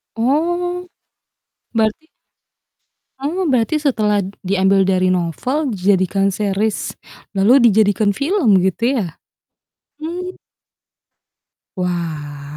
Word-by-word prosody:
Oh. 345 +8 0 0.9
Berarti 220 +8 0 1.1
Oh, 325 +5 -1
berarti 260 +4 +1
setelah 210 -8 +1 0.2
diambil 190 0 +3
dari 185 -1 +2
novel 230 - -1
jadikan 195 0 +2
series 205 +2 -1 0.4
lalu 235 +6 +5
dijadikan 205 0 +2
film 280 - +2
gitu, 230 +8 +1
ya? 185 - -3 0.8
Mmm. 360 +3 -5 1.4
Wah. 155 -5 -4
210 Hz, 80 wpm, -18 LUFS, 190-280 Hz, 1.4 s, lalu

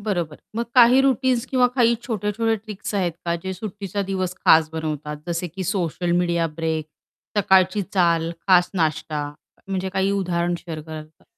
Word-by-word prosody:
बरोबर. 175 -7 -2 0.2
मग 235 - 0
काही 250 +1 +7
रूटीन्स 260 -2 +2
किंवा 255 -2 +3
काही 235 -2 +4
छोटे-छोटे 225 -1 -1
ट्रिक्स 210 -1 -7
आहेत 180 -4 +1
का, 170 0 0
जे 190 +3 -5
सुट्टीचा 200 0 -4
दिवस 185 -2 -2
खास 160 -1 +6
बनवतात 150 -2 -4
जसे 170 +1 -2
की 185 +3 -6
सोशल 175 -2 -1
मीडिया 170 -1 +1
ब्रेक, 160 0 -3 0.5
सकाळची 190 0 +4
चाल, 170 -3 +2 0.2
खास 180 -2 +5
नाश्ता 155 -3 -1 0.4
म्हणजे 190 -1 -2
काही 190 +1 0
उदाहरण 175 -3 0
शेअर 160 -2 -5
कराल 155 0 -8
का? - - -27
185 Hz, 160 wpm, -23 LUFS, 165-205 Hz, 0.5 s, काही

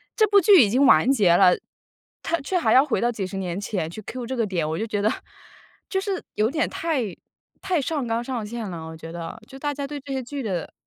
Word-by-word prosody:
这 435 - +5
部 400 -1 +5
剧 385 -3 +7
已 205 - +1
经 255 +6 +3
完 255 - +6
结 200 -10 +4
了， 180 -2 +6 0.7
它 335 +1 0
却 365 +7 -1
还 345 - +2
要 260 - +7
回 285 - -1
到 240 +1 +1
几 200 -5 -4
十 195 +1 -6
年 185 0 -3
前 190 -6 -2
去 175 +6 -8
cue 245 +4 -6
这 260 +2 -4
个 230 -3 0
点， 170 -5 -1
我 160 +2 -2
就 225 - -2
觉 210 -1 -2
得 215 +2 +2 0.8
就 385 - 0
是 390 -2 -3
有 215 +2 +2
点 315 +1 0
太 320 -7 -1 0.6
太 360 -6 0
上 290 -2 -2
纲 230 +1 -1
上 240 -4 -4
线 225 -1 -5
了， 165 -2 -7
我 160 - -8
觉 165 +1 -9
得， 170 +2 -6
就 270 - -11
大 290 0 -2
家 280 0 -4
对 290 0 -6
这 275 0 -7
些 265 -1 -2
剧 275 +3 -5
的 185 -6 -3
235 Hz, 280 characters per minute, -24 LUFS, 195-285 Hz, 0.8 s, 剧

